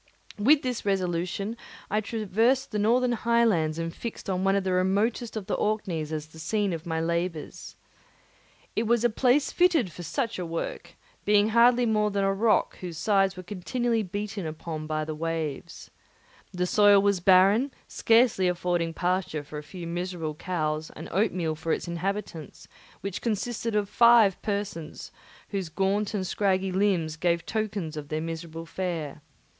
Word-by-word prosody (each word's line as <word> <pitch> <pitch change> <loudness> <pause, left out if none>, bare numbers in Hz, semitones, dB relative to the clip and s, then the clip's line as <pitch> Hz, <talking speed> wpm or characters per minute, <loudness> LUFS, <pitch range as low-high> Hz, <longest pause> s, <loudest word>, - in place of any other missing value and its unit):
With 280 +8 +5
this 250 -2 -2
resolution 185 +2 -1 0.4
I 215 +1 +2
traversed 225 +5 0
the 210 - -1
northern 240 +4 +3
highlands 225 -9 +2
and 165 0 -3
fixed 225 -3 -6
on 185 0 -1
one 195 0 +3
of 200 - +1
the 190 -1 0
remotest 205 +6 0
of 205 - -5
the 210 - -3
Orkneys 190 -8 -1
as 155 -1 -3
the 160 +1 -15
scene 205 +2 0
of 165 +1 -6
my 160 -1 -1
labours. 170 -1 -3 1.0
It 220 +1 0
was 235 0 +2
a 240 - +3
place 255 +5 +2
fitted 335 - +3
for 175 - -9
such 230 - -2
a - - -2
work, 170 +1 -5 0.3
being 210 +1 +4
hardly 240 +2 +5
more 215 -2 +2
than 200 -1 -1
a 195 0 +2
rock 215 +3 +2
whose 175 -3 -6
high 195 +1 +3
sides 190 -1 -5
were 185 - -7
continually 225 +5 -1
beaten 205 -1 -4
upon 155 0 -6
by 155 0 -1
the 155 - -4
waves. 160 -2 -4 0.6
The 180 0 -1
soil 205 +1 +6
was 200 -1 +2
barren, 195 +9 +5 0.2
scarcely 225 -5 +3
affording 175 -2 -1
pasture 180 -4 -1
for 150 +1 -7
a - - -7
few 170 +4 -9
miserable 170 -2 -3
cows, 155 -2 -2
and 160 - -8
oatmeal 180 -5 0
for 160 +1 -4
its - - -3
inhabitants, 170 -2 -5 0.3
which 200 -1 -4
consisted 230 0 -2
of 205 -1 +1
five 235 -4 +5
persons, 200 -6 -4 0.4
whose 195 -5 -3
gaunt 200 +5 0
and 190 -2 -1
scraggy 190 -1 0
limbs 180 -5 +1
gave 170 0 0
tokens 205 -7 -3
of 150 -1 -6
their 155 - -1
miserable 165 0 -6
fare. 165 -4 -4
190 Hz, 165 wpm, -27 LUFS, 165-215 Hz, 1.0 s, soil